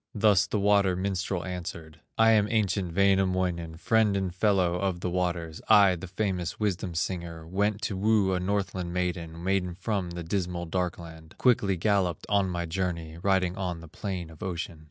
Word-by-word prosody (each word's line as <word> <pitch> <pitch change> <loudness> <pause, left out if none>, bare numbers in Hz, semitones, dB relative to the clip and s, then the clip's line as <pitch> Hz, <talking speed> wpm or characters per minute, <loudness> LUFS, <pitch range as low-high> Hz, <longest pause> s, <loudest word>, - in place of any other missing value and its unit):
Thus 105 -3 +4
the 105 - -1
water 100 -2 +3
minstrel 95 -1 -2
answered: 85 -3 -6 0.2
"I 115 0 +6
am 105 -2 +4
ancient 100 -6 0
Wainamoinen, 95 -4 +1
Friend 110 0 +2
and 95 -2 -2
fellow 95 -3 +2
of 95 -2 -2
the 90 - -2
waters, 85 -3 -2
I, 100 -2 +7
the 90 +2 -8
famous 90 -2 -2
wisdom 95 -4 -1
singer; 85 -2 -3
Went 100 +4 -1
to 100 - -1
woo 100 -1 +2
a 90 - 0
Northland 95 -2 -2
maiden, 85 -2 -3
Maiden 90 -2 0
from 95 -1 -2
the 85 0 -6
dismal 90 0 -2
Darkland, 85 -2 -5
Quickly 105 -7 +3
galloped 95 -3 +1
on 100 -2 +2
my 85 -1 -2
journey, 85 -2 -3
Riding 95 -2 +2
on 90 -3 -3
the 85 - -11
plain 90 0 -5
of 80 - -15
ocean. 85 -3 -4
90 Hz, 170 wpm, -28 LUFS, 85-100 Hz, 0.2 s, I